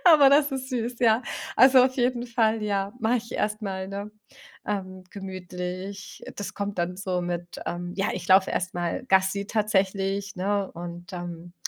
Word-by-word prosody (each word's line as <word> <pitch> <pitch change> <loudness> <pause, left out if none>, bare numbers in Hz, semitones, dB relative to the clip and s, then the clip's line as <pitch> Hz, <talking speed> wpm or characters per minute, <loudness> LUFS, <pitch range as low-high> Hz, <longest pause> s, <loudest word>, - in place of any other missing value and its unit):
Aber 305 -6 +8
das 285 +1 +5
ist 265 0 -3
süß, 240 -1 -2
ja. 230 0 +4 0.3
Also 260 -1 +8
auf 260 0 0
jeden 245 -1 +1
Fall, 225 -2 +2
ja, 200 -1 -1
mach 225 +2 +2
ich 230 0 -6
erst 215 +1 -1
mal, 190 -2 -3
ne, 200 +1 -5 0.6
ähm, 185 -2 -4
gemütlich. 185 +1 -6
Das 205 - -5
kommt 200 -1 -3
dann 175 +1 -1
so 185 -2 -1
mit, 175 0 -4
ähm, 175 +1 -3
ja, 195 - +1
ich 175 -1 -5
lauf 190 0 +6
erst 185 0 -2
mal 175 +8 -2
Gassi 190 0 +2
tatsächlich, 195 -2 0
ne 200 +1 0
und 175 +1 -8
dann 175 -1 -7
195 Hz, 170 wpm, -26 LUFS, 185-225 Hz, 0.6 s, Aber